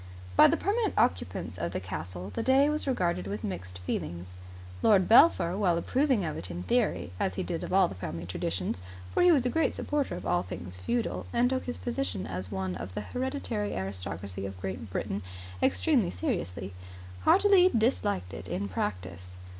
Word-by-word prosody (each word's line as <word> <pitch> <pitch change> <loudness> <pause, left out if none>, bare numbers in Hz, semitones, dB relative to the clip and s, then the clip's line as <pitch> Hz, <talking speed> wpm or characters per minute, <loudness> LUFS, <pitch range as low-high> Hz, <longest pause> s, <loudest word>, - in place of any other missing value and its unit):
By - - +9
the - - +2
permanent 425 +1 0
occupants 90 -1 0
of 85 +2 -2
the - - -1
castle 90 +1 -6
the - - -2
day 275 +3 +4
was 300 -1 -2
regarded 175 - 0
with 100 +2 -4
mixed 90 -1 -5
feelings. 90 0 -4 0.5
Lord 195 -4 +5
Belpher, 225 - +6
while 185 -4 +2
approving 255 - +1
of 155 - -3
it 95 - -5
in 90 0 -5
theory, 90 - +1
as 95 - 0
he - - -2
did 165 - -3
of - - -5
all 190 -1 +5
the - - -7
family 85 -2 -5
traditions 90 0 -3 0.3
for - - +2
he 355 0 +7
was 275 -6 +3
a - - +3
great 320 +5 +1
supporter 295 -2 -1
of - - -7
all 90 - +2
things 90 0 -7
feudal, 235 - -2
and 245 +1 +2
took 260 0 -1
his 245 - -4
position 245 - -3
as 90 +1 -5
one 95 -1 -2
of 90 +2 -7
the - - -2
hereditary 105 -1 -3
aristocracy 95 0 -5
of 95 -1 -9
Great 95 +3 -5
Britain 95 +2 -3 0.4
extremely 90 -1 +3
seriously 90 +1 -3 0.5
heartily 385 - +6
disliked 215 - 0
it 90 - -7
in 90 +3 -2
practice. 90 -2 -4
95 Hz, 185 wpm, -29 LUFS, -, 0.5 s, By